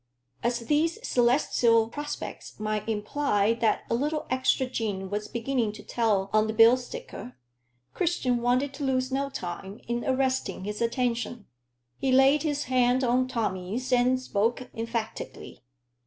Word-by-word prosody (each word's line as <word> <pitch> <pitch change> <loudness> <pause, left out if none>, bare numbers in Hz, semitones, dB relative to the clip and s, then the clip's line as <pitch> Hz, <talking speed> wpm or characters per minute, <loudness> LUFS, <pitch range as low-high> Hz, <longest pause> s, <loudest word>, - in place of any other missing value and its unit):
As 240 0 0
these 310 - +1
celestial 235 -2 +3
prospects 295 -1 -6
might 215 0 -2
imply 215 -1 +1
that 220 -2 +2
a - - -1
little 295 +6 -1
extra 260 0 +2
gin 205 -6 -3
was 210 +1 -2
beginning 235 -2 -1
to - - -11
tell 205 -5 0
on 215 0 +4
the 220 - -2
bill 225 +2 +7
sticker, 255 - -8 0.6
Christian 315 -8 0
wanted 255 +3 +1
to 285 - -6
lose 260 -1 0
no 275 +1 -1
time 195 -3 -6
in 240 0 -2
arresting 260 -7 0
his 210 +2 -5
attention. 235 -2 -1 0.5
He 265 - +1
laid 270 +3 +5
his 290 -2 -1
hand 255 0 +2
on 255 +1 +2
Tommy's 225 +1 -2
and 250 +1 +3
spoke 240 +1 -1
emphatically. 230 -1 -5
245 Hz, 140 wpm, -27 LUFS, 220-260 Hz, 0.6 s, bill